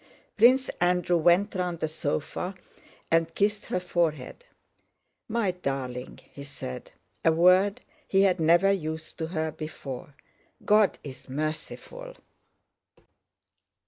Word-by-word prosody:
Prince 255 +4 +5
Andrew 180 0 +2
went 175 +5 +3
round 180 -2 -2
the 155 - -1
sofa 155 +4 -3 0.6
and 165 0 +2
kissed 205 0 0
her 180 - -1
forehead. 170 - -2 0.9
"My 220 -4 +1
darling!" 135 -7 -4 0.2
he 140 - -9
said—a 140 - -4
word 180 +5 +4 0.3
he 195 0 +3
had 185 -2 +3
never 170 +5 +4
used 160 -4 -4
to 160 - -2
her 160 -2 -2
before. 145 -3 -8 0.5
"God 210 -2 +4
is 135 -2 -10
merciful...." 155 - -5
170 Hz, 110 wpm, -27 LUFS, 155-195 Hz, 0.9 s, Prince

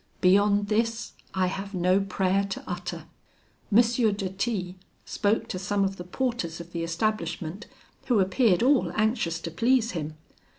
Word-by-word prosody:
Beyond 205 +2 +4
this, 225 +1 0 0.2
I 190 -1 +2
have 195 +2 -4
no 185 +2 +3
prayer 195 0 +1
to 195 - -5
utter.' 175 -2 -5 0.7
"M. 215 +4 +7
de 220 -5 0
T 190 -2 -2 0.3
spoke 210 +1 0
to 185 - -3
some 200 +2 0
of 195 0 -1
the 180 - -6
porters 180 -4 -2
of 170 0 -9
the 170 -1 -3
establishment, 170 +1 -2 0.4
who 240 -5 +3
appeared 190 +2 +3
all 270 +1 +3
anxious 215 -7 +1
to 165 - -5
please 230 +6 +2
him. 155 -3 -4
195 Hz, 155 wpm, -27 LUFS, 180-220 Hz, 0.7 s, M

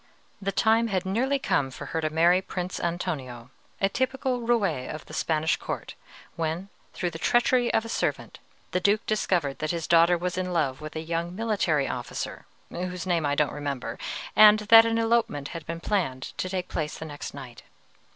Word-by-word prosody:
"The 195 0 -1
time 225 +3 +3
had 190 -3 -1
nearly 250 +9 +1
come 145 - 0
for 130 - -8
her 160 - 0
to 155 - 0
marry 170 +4 +4
Prince 180 -1 -4
Antonio, 135 -9 -4 0.3
a 195 - +3
typical 260 +3 -1
roué 230 - 0
of 155 - -7
the - - -12
Spanish 160 0 +1
court, - - -5 0.4
when, 165 +4 -3 0.2
through 175 - -3
the 165 - -7
treachery 240 +4 +3
of 225 - +1
a - - -7
servant, - - -2 0.3
the 180 - +1
Duke 205 +4 +2
discovered 175 -9 0
that 155 - -2
his 165 -1 -2
daughter 170 +1 +5
was 180 +1 -2
in 180 -1 -2
love 145 -5 0
with 155 +1 -8
a 160 - -2
young 170 +2 -3
military 195 -10 +1
officer 125 -1 -5 0.2
whose 180 0 -4
name 170 -5 +1
I 145 - +1
don't 150 0 +1
remember, 140 -3 -4 0.4
and 215 0 +9
that 225 +2 +7
an 225 0 +1
elopement 225 -11 +1
had 165 -2 -8
been 165 +1 -4
planned 165 -9 -2
to 185 - -1
take 185 -1 -3
place 150 -2 -3
the 160 - -7
next 145 -2 -7
night. 125 -5 -10
175 Hz, 190 wpm, -26 LUFS, 155-210 Hz, 0.4 s, and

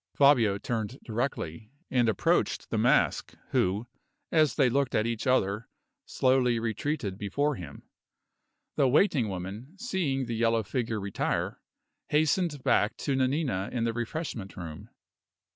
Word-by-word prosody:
Fabio 125 -8 +5
turned 115 +3 -3
directly, 110 - -3 0.2
and 120 -3 +3
approached 110 - +1
the - - 0
Mask, - - +2 0.2
who, 100 +5 +1 0.5
as 155 -3 +3
they 135 -4 +4
looked 135 +1 +1
at 110 - +2
each 115 0 -2
other, 110 -4 +1 0.4
slowly 130 -2 +2
retreated 115 -2 -2
before 145 +9 0
him. 85 - -9 0.9
The 135 - +4
waiting 135 - +3
woman, 100 - -6
seeing 180 - -1
the 120 - -4
yellow 115 0 +2
figure 110 +1 -2
retire, 100 -1 -2 0.5
hastened 155 -1 +1
back 105 - +2
to 140 - -1
Nanina 130 - 0
in 120 -2 -1
the 115 0 0
refreshment 120 - -4
room. 80 -4 -8
120 Hz, 130 wpm, -28 LUFS, 105-140 Hz, 0.9 s, Fabio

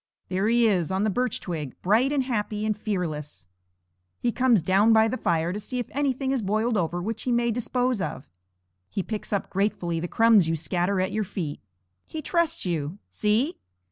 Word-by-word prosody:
There 190 +3 0
he 235 0 +4
is 185 -5 +1
on 190 +2 +1
the 215 - +2
birch 250 +2 0
twig, 155 -7 -5
bright 225 +9 +3
and 280 -2 +1
happy 215 -4 -2
and 215 -1 +1
fearless! 165 - -4 0.7
He 240 - +1
comes 245 -7 +3
down 200 +6 +4
by 220 0 +5
the 225 - -1
fire 170 -6 0
to 205 - -3
see 230 +5 -5
if 245 - -4
anything 270 -1 0
has 265 -3 0
boiled 215 +4 0
over 175 -2 0
which 220 +2 -3
he 250 - -1
may 235 0 +2
dispose 245 0 0
of. 145 - -4 0.6
He 195 - -2
picks 215 +1 -5
up 200 -2 -1
gratefully 180 -4 0
the 175 - -3
crumbs 220 -5 +5
you 165 - +1
scatter 180 +4 0
at 185 +1 0
your 215 +2 0
feet. 180 -7 -4 0.5
He 315 - -6
trusts 340 - +1
you. 165 0 -2
See! 230 - +1
210 Hz, 195 wpm, -26 LUFS, 180-235 Hz, 0.7 s, by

